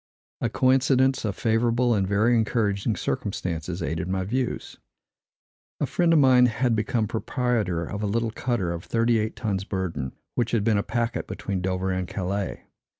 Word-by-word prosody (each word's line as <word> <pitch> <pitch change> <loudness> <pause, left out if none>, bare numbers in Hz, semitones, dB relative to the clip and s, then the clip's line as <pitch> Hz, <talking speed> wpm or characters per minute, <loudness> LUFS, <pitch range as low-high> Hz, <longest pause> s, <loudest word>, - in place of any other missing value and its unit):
A - - +1
coincidence 130 0 +3
of 100 -3 -2
favorable 120 +1 +2
and 100 -3 +1
very 110 +5 +3
encouraging 110 -1 +1
circumstances 85 -1 -3
aided 80 +2 -2
my 95 0 -1
views. 125 +5 -3 1.0
A - - +1
friend 175 -1 +1
of 165 - +5
mine 130 -3 +6
had 120 0 +1
become 110 +1 0
proprietor 110 -6 -1
of 100 +5 -5
a 105 - 0
little 115 +2 0
cutter 110 -7 -1
of 85 0 -5
thirty 115 0 +2
eight 110 +1 -2
tons 100 -4 -2
burden, 85 -10 -3 0.2
which 120 -1 -1
had 110 -3 +2
been 110 -2 +3
a - - +2
packet 115 +3 -2
between 95 -3 -3
Dover 95 0 -1
and 90 -1 -2
Calais. 95 +2 -3
110 Hz, 165 wpm, -25 LUFS, 95-120 Hz, 1.0 s, mine